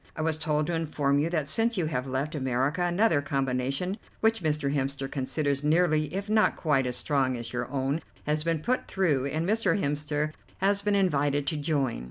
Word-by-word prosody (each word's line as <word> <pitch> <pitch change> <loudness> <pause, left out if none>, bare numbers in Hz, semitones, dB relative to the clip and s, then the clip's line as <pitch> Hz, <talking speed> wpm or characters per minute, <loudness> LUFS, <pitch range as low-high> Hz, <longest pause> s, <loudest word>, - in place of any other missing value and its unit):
I 155 - -2
was 160 -1 0
told 150 -1 0
to 175 - -2
inform 145 -3 +1
you 155 +3 +1
that 155 -4 -1
since 225 +8 +2
you 175 - +1
have 130 -4 -2
left 135 +4 -2
America 135 +3 0
another 175 -2 +2
combination 135 - -1 0.2
which 225 -1 +2
Mr. 150 -3 0
Hemster 135 -1 -2
considers 140 +1 -1
nearly 155 -1 +2
if 195 +3 -3
not 215 0 +3
quite 135 -5 +1
as 125 - -1
strong 135 -4 0
as 120 +1 -7
your 120 -1 -3
own 140 +3 -1 0.2
has 150 0 +1
been 165 -2 0
put 255 +1 0
through, 150 -9 +1
and 155 +4 -2
Mr. 220 0 +2
Hemster 150 0 -1 0.2
has 200 +1 +2
been 205 0 +1
invited 145 -7 +1
to 150 - 0
join. 145 - 0
150 Hz, 195 wpm, -28 LUFS, 140-170 Hz, 0.2 s, not